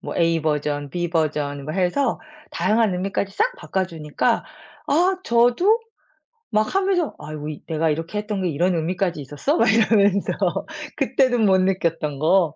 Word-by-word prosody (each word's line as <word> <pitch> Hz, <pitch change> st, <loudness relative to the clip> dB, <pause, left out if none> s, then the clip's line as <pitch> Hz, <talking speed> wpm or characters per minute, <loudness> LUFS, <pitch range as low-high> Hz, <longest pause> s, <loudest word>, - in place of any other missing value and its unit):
뭐 -, -, -6 dB
A 165 Hz, -1 st, +2 dB
버전 150 Hz, -2 st, -1 dB
B 175 Hz, -1 st, -2 dB
버전 150 Hz, -4 st, -1 dB
뭐 155 Hz, -, -4 dB
해서 190 Hz, +9 st, 0 dB, 0.3 s
다양한 220 Hz, -2 st, +1 dB
의미까지 195 Hz, +2 st, -2 dB
싹 -, -, +1 dB
바꿔 190 Hz, -, -2 dB
주니까 155 Hz, -4 st, -1 dB, 0.4 s
아 360 Hz, +6 st, +3 dB
저도 245 Hz, -, +3 dB, 0.7 s
막 215 Hz, 0 st, +1 dB
하면서 380 Hz, -5 st, +1 dB
'아이고 150 Hz, 0 st, -7 dB, 0.2 s
내가 160 Hz, 0 st, 0 dB
이렇게 165 Hz, +6 st, -4 dB
했던 210 Hz, -2 st, -3 dB
게 180 Hz, -, 0 dB
이런 175 Hz, +4 st, +1 dB
의미까지 170 Hz, 0 st, -1 dB
있었어?' 145 Hz, -, -1 dB
막 -, -, +4 dB
이러면서 205 Hz, -3 st, +3 dB, 0.7 s
그때도 255 Hz, -3 st, +2 dB
못 195 Hz, -4 st, +4 dB
느꼈던 165 Hz, -6 st, -1 dB
거. 165 Hz, 0 st, +3 dB
185 Hz, 300 characters per minute, -22 LUFS, 155-220 Hz, 0.7 s, 막